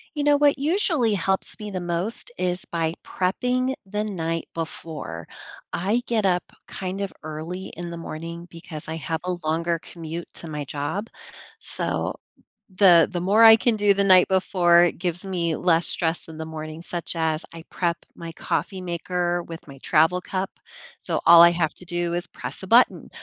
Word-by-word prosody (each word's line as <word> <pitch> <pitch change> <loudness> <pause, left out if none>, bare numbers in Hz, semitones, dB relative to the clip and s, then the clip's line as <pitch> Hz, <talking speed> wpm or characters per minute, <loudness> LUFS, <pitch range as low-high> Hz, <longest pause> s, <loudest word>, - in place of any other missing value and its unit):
You 290 - -1
know 290 0 +5
what 285 -1 +4
usually 305 - +1
helps 190 +2 -1
me 210 -1 -6
the 185 -2 -3
most 175 +8 -2
is 180 0 -1
by 165 -1 0
prepping 250 +8 0
the 210 +2 -2
night 165 -5 -3
before. 155 - -6 0.5
I 205 +8 0
get 220 -4 +1
up 180 -1 +3 0.3
kind 190 +1 -4
of 200 - -3
early 160 +4 -6
in 175 +1 -6
the 170 - -6
morning 165 +1 -7
because 165 -2 -9
I 160 - -4
have 160 0 -3
a 180 0 -1
longer 165 +2 0
commute 165 0 -7
to 170 - -5
my 150 -1 -4
job, 145 +9 -4 0.5
so - - -3 0.6
the 175 -5 +7
the 180 - -2
more 205 +5 +4
I 225 0 +10
can 230 0 +2
do 205 -1 +4
the 200 0 +1
night 185 -2 +6
before, 180 -2 +4
it 175 - 0
gives 180 +1 -3
me 170 -4 -1
less 170 -1 +3
stress 165 -1 -1
in 160 - -9
the 160 - -5
morning, 155 0 -7
such 175 0 -3
as, 160 0 0
I 165 -1 -9
prep 170 -2 -1 0.2
my 170 -1 -7
coffee 190 +2 -2
maker 175 0 -2
with 165 -2 -10
my 135 -1 -12
travel 165 +6 +3
cup, 190 +1 -3 0.5
so - - -2
all 170 0 +9
I 170 - +8
have 165 -3 0
to 180 - -12
do 175 -1 -2
is 175 - -2
press - - -8
a - - -6
button, 235 +5 +4
175 Hz, 185 wpm, -24 LUFS, 165-195 Hz, 0.6 s, I